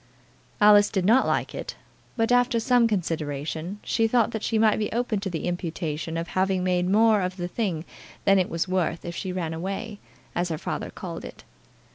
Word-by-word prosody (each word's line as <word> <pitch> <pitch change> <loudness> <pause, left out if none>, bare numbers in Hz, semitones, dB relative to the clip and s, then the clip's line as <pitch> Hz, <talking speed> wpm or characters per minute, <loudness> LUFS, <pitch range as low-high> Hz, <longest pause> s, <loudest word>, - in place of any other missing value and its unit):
Alice 205 -1 +7
did 190 -3 -1
not 235 +6 +4
like - - 0
it, - - -6 0.4
but, 225 +1 +1
after 245 -1 +3
some 245 0 +4
consideration, 160 -2 -3
she 225 -1 +1
thought 235 0 +2
that 220 - -4
she 225 - 0
might 215 -1 +3
be 210 - -2
open 235 -3 -1
to 195 -1 -3
the 165 -3 -4
imputation 165 -2 -3
of 165 +1 -4
having 190 -1 +1
made 180 0 +1
more 215 +1 +4
of 185 +1 -3
the 175 -1 -3
thing 175 -5 -2 0.4
than 195 -1 +5
it 185 - 0
was 165 +2 -1
worth 180 -3 -1
if 170 0 -5
she 185 - -4
ran 170 -3 -3
away, 195 +5 -5 0.3
as 175 0 -1
her 160 - -2
father - - -4
called - - -7
it. - - -10
190 Hz, 195 wpm, -25 LUFS, 170-220 Hz, 0.4 s, Alice